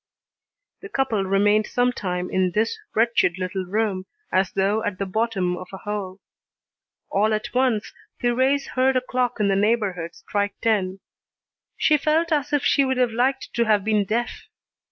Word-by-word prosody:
The 410 Hz, -, -9 dB
couple 260 Hz, -, 0 dB
remained 205 Hz, +2 st, +3 dB
some 245 Hz, 0 st, +1 dB
time 180 Hz, -6 st, -3 dB
in 185 Hz, -1 st, +1 dB
this 225 Hz, -, 0 dB, 0.2 s
wretched 225 Hz, -6 st, +2 dB
little 185 Hz, 0 st, -3 dB
room, 195 Hz, -1 st, -1 dB, 0.2 s
as 190 Hz, 0 st, +2 dB
though 200 Hz, +3 st, +1 dB
at 205 Hz, -4 st, -2 dB
the 195 Hz, -, -2 dB
bottom 195 Hz, -3 st, -1 dB
of 185 Hz, 0 st, -8 dB
a 190 Hz, -, -7 dB
hole. 200 Hz, -2 st, -5 dB, 0.9 s
All 215 Hz, +2 st, +2 dB
at 215 Hz, -, -5 dB
once, 250 Hz, -5 st, +1 dB, 0.3 s
Thérèse 260 Hz, +3 st, +1 dB
heard 260 Hz, +1 st, +2 dB
a -, -, +1 dB
clock 250 Hz, -1 st, -1 dB
in 210 Hz, -, +2 dB
the 195 Hz, -, +2 dB
neighbourhood 195 Hz, -5 st, 0 dB
strike 205 Hz, 0 st, -2 dB
ten. 195 Hz, -4 st, 0 dB, 0.8 s
She 305 Hz, -, +4 dB
felt 315 Hz, +3 st, +1 dB
as 295 Hz, -2 st, 0 dB
if 290 Hz, -1 st, +1 dB
she 280 Hz, -, +4 dB
would 260 Hz, -1 st, 0 dB
have 250 Hz, -2 st, +2 dB
liked 260 Hz, +4 st, 0 dB
to 235 Hz, -, +1 dB
have 210 Hz, -3 st, +3 dB
been 210 Hz, -1 st, +2 dB
deaf. 235 Hz, +4 st, -3 dB
215 Hz, 170 wpm, -23 LUFS, 195-250 Hz, 0.9 s, She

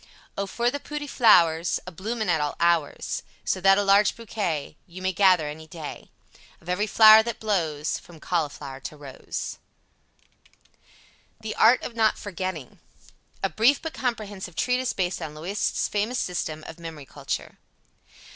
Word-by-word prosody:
O 200 Hz, 0 st, -2 dB
for 235 Hz, +4 st, 0 dB
the 285 Hz, -, -4 dB
pooty 295 Hz, +1 st, -6 dB
flouers 175 Hz, -, +4 dB
A -, -, -7 dB
bloomin 220 Hz, +6 st, -4 dB
at 165 Hz, -3 st, +2 dB
all 145 Hz, -1 st, -2 dB
ours, 170 Hz, -3 st, +1 dB, 0.2 s
So 185 Hz, -, -1 dB
that 195 Hz, +1 st, +6 dB
a 205 Hz, -, +2 dB
large 200 Hz, +1 st, +4 dB
Bokay 195 Hz, -11 st, -3 dB
Yew 180 Hz, +1 st, -10 dB
may 185 Hz, 0 st, -1 dB
gether 180 Hz, -5 st, +4 dB
any 155 Hz, +2 st, -8 dB
day 160 Hz, -2 st, -8 dB, 0.5 s
Of -, -, -21 dB
ev'ry 190 Hz, +4 st, 0 dB
flour 215 Hz, +1 st, +8 dB
that 235 Hz, +1 st, -5 dB
blose 160 Hz, -8 st, -1 dB
from 170 Hz, -2 st, -15 dB
Colleflour 145 Hz, -5 st, -3 dB
to 150 Hz, -, -6 dB
rose. 140 Hz, -3 st, -6 dB, 1.8 s
THE 220 Hz, -1 st, -4 dB
ART 235 Hz, +3 st, +5 dB
OF -, -, -5 dB
NOT 220 Hz, -2 st, +2 dB
FORGETTING. 185 Hz, -7 st, -6 dB, 0.6 s
A -, -, +2 dB
Brief 245 Hz, +6 st, +4 dB
but 320 Hz, -1 st, -6 dB
Comprehensive 205 Hz, -7 st, -4 dB
Treatise 250 Hz, +3 st, 0 dB
Based 180 Hz, -1 st, -2 dB
on 155 Hz, -2 st, -6 dB
Loisette's 180 Hz, +7 st, -1 dB
Famous 215 Hz, +5 st, -1 dB
System 155 Hz, -5 st, -3 dB
of 160 Hz, -, -10 dB
Memory 160 Hz, -4 st, -8 dB
Culture. -, -, -5 dB
185 Hz, 155 wpm, -25 LUFS, 160-220 Hz, 1.8 s, flour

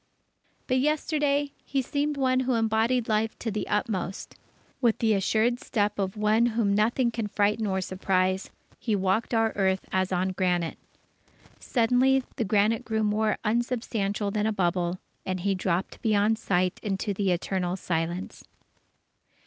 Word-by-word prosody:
But 255 Hz, -1 st, +1 dB
yesterday, 290 Hz, 0 st, +1 dB
he 270 Hz, -1 st, -1 dB
seemed 290 Hz, +2 st, -1 dB
one 255 Hz, -1 st, +2 dB
who 260 Hz, -1 st, +1 dB
embodied 225 Hz, +2 st, +1 dB
Life 220 Hz, 0 st, 0 dB
to 225 Hz, -, -3 dB
the 210 Hz, -, -3 dB
utmost. 200 Hz, -2 st, -2 dB, 0.5 s
With 235 Hz, -3 st, +3 dB
the 220 Hz, -2 st, +2 dB
assured 220 Hz, +5 st, +1 dB
step 210 Hz, -4 st, -1 dB
of 195 Hz, +1 st, -2 dB
one 215 Hz, +3 st, +3 dB
whom 220 Hz, -3 st, +1 dB
nothing 235 Hz, +4 st, +2 dB
can 225 Hz, -2 st, -3 dB
frighten 210 Hz, +1 st, +1 dB
or 190 Hz, -1 st, 0 dB
surprise, 185 Hz, 0 st, 0 dB, 0.3 s
he 220 Hz, -3 st, 0 dB
walked 195 Hz, +3 st, 0 dB
our 225 Hz, -1 st, +2 dB
earth 190 Hz, -1 st, +1 dB
as 190 Hz, 0 st, 0 dB
on 185 Hz, +1 st, +1 dB
granite. 180 Hz, -3 st, -1 dB, 0.8 s
Suddenly, 255 Hz, +2 st, +2 dB
the 235 Hz, -, +1 dB
granite 210 Hz, +2 st, +2 dB
grew 220 Hz, -1 st, -1 dB
more 215 Hz, +1 st, +1 dB
unsubstantial 220 Hz, -3 st, -1 dB
than 210 Hz, +1 st, 0 dB
a -, -, +1 dB
bubble, 175 Hz, -2 st, 0 dB, 0.3 s
and 185 Hz, -1 st, -3 dB
he 200 Hz, +2 st, +1 dB
dropped 185 Hz, -1 st, -2 dB
beyond 215 Hz, 0 st, +2 dB
sight 185 Hz, -3 st, 0 dB
into 200 Hz, 0 st, -2 dB
the 195 Hz, -1 st, 0 dB
Eternal 180 Hz, 0 st, -1 dB
Silence. 170 Hz, 0 st, -3 dB
210 Hz, 150 wpm, -27 LUFS, 190-235 Hz, 0.8 s, With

